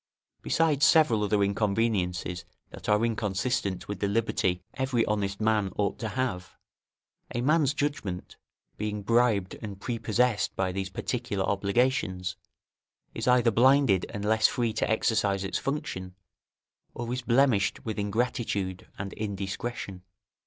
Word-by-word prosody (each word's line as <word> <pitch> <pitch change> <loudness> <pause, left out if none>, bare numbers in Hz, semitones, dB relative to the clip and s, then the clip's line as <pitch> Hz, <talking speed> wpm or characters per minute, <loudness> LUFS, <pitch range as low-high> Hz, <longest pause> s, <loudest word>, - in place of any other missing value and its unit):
Besides 155 -3 +2
several 135 -10 +5
other 105 0 +2
inconveniences 100 -4 0 0.3
that - - -7
are 105 +2 +4
inconsistent 105 -2 -1
with 105 -2 -5
the 100 - 0
liberty 100 -4 0
every 130 -4 0
honest 100 -2 -1
man 105 -3 +1
ought 100 -1 -1
to 110 - -2
have, 115 -7 -3 0.8
a 120 - 0
man's 150 +1 +3
judgment, 145 -12 -3 0.4
being 105 -1 -3
bribed 115 -3 +2
and 100 -3 -7
prepossessed 115 0 0
by 95 -1 0
these 95 +1 -3
particular 105 -1 -2
obligations, 100 -3 0 0.8
is - - -4
either 125 -2 +5
blinded 125 -4 +4
and 100 0 -5
less 110 +1 +4
free 120 -3 -1
to - - -1
exercise 105 -3 +1
its 95 - -2
function, 95 -10 -4 0.8
or 120 0 -3
is 125 - -2
blemished 120 -3 +2
with 110 -2 -3
ingratitude 100 -3 -2
and 95 0 -5
indiscretion. 100 -1 -4
105 Hz, 130 wpm, -28 LUFS, 100-120 Hz, 0.8 s, several